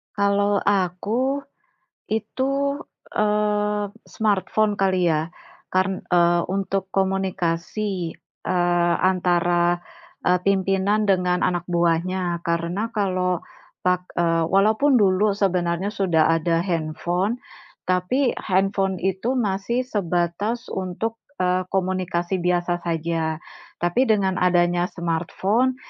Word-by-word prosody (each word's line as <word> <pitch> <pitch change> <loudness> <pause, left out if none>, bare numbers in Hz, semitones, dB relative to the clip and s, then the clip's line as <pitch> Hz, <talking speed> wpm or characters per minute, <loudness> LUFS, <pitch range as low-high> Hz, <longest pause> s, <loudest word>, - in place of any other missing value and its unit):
Kalau 200 0 +2
aku 205 +9 0 0.7
itu, 275 +6 -1 0.3
eee, 210 0 +1 0.2
smartphone 215 0 +1
kali 185 -2 +2
ya. 160 +1 0 0.4
Karn 185 0 0
eee, 175 -1 +4
untuk 195 0 -2
komunikasi, 190 -1 -1 0.3
eee, 175 -1 +2
antara, 175 -1 +2 0.4
eee, 180 0 +4
pimpinan 195 +2 +1
dengan 180 -2 +2
anak 175 -1 -1
buahnya. 175 +1 0
Karena, 170 +6 -1
kalau 185 -5 -1 0.4
pak 180 0 +1
eee 165 -1 +2
walaupun 220 +9 +4
dulu 200 0 +3
sebenarnya 185 -1 0
sudah 170 -6 +2
ada 165 +1 +1
handphone, 175 +5 -1 0.5
tapi 185 +9 +1
handphone 195 0 +1
itu 190 +7 0
masih 230 +2 0
sebatas 205 +2 -2
untuk, 190 +5 -3 0.2
eee, 180 0 +1
komunikasi 185 -1 -1
biasa 175 0 0
saja. 165 -1 -1 0.4
Tapi, 175 +10 +2
dengan 195 -4 +2
adanya 175 -1 +2
smartphone, 190 +9 0
185 Hz, 95 wpm, -23 LUFS, 175-205 Hz, 0.7 s, eee